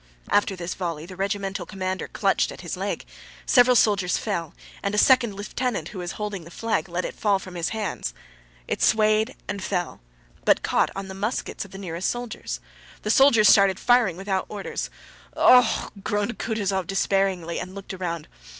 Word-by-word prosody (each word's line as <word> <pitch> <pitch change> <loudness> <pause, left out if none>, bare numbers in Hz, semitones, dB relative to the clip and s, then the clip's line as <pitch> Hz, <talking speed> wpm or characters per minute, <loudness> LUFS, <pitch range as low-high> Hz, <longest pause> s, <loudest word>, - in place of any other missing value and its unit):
After 205 -1 +3
this 175 0 -4
volley 165 -4 -4
the 185 +1 -10
regimental 195 -1 -2
commander 185 -2 -3
clutched - - +1
at - - -10
his - - -4
leg; - - -3 0.4
several 250 -1 +5
soldiers 200 -6 +3
fell, 170 -8 -3 0.3
and 200 +1 -1
a - - -1
second 235 -3 +5
lieutenant 205 -3 -3
who 190 - -8
was 175 -1 -4
holding 210 -4 -4
the 165 - -12
flag 220 +1 -2
let 175 +1 -2
it - - -4
fall 205 -2 +2
from 185 -1 -10
his 170 -1 -2
hands. 210 - -3 0.5
It - - -2
swayed 215 +2 +3
and 200 0 -4
fell, 180 - -2 0.4
but - - +3
caught - - +2
on 195 0 -5
the 190 - -7
muskets 205 +2 -3
of - - -13
the 195 - -9
nearest 180 -2 -3
soldiers. 240 -1 -4 0.4
The 210 - +1
soldiers 235 -5 +6
started 195 -2 +6
firing 240 -8 +3
without 190 0 -2
orders. 205 -2 -4 0.5
"Oh! 250 0 +8
Oh! 225 - -1
Oh!" - - -10
groaned 210 +2 -1
Kutúzov 200 -5 -1
despairingly 195 -3 0
and 185 +1 -7
looked 200 0 -7
around.... 170 -4 -4
195 Hz, 180 wpm, -25 LUFS, 185-215 Hz, 0.5 s, Oh